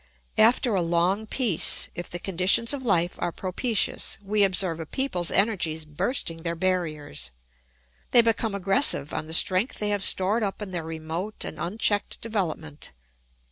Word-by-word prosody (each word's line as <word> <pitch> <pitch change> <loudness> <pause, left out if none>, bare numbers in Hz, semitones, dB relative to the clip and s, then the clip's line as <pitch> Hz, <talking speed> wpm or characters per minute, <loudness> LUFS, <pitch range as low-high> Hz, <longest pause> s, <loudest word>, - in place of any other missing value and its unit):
After 235 +1 +4
a 190 - +2
long 175 +5 0
peace, 220 - 0
if 175 - -7
the 175 - -4
conditions 195 +7 +2
of 280 - -4
life 175 -6 +1
are 175 - -1
propitious, 200 +6 -1
we 205 +1 +2
observe 185 -3 +1
a 160 - -6
people's 180 - -1
energies 175 -7 0
bursting 165 - -2
their 170 0 -3
barriers; 155 - -2 0.8
they 240 - +7
become 225 -2 0
aggressive 195 - +2
on 155 - -4
the 160 - -5
strength 185 +8 +3
they 210 - -1
have 205 -1 -1
stored 200 +5 +3
up 200 -2 -2
in 205 -3 -6
their 175 -2 -3
remote 160 +5 -5
and - - -7
unchecked 205 +3 0
development. 165 -9 -4
185 Hz, 155 wpm, -25 LUFS, 165-215 Hz, 0.8 s, they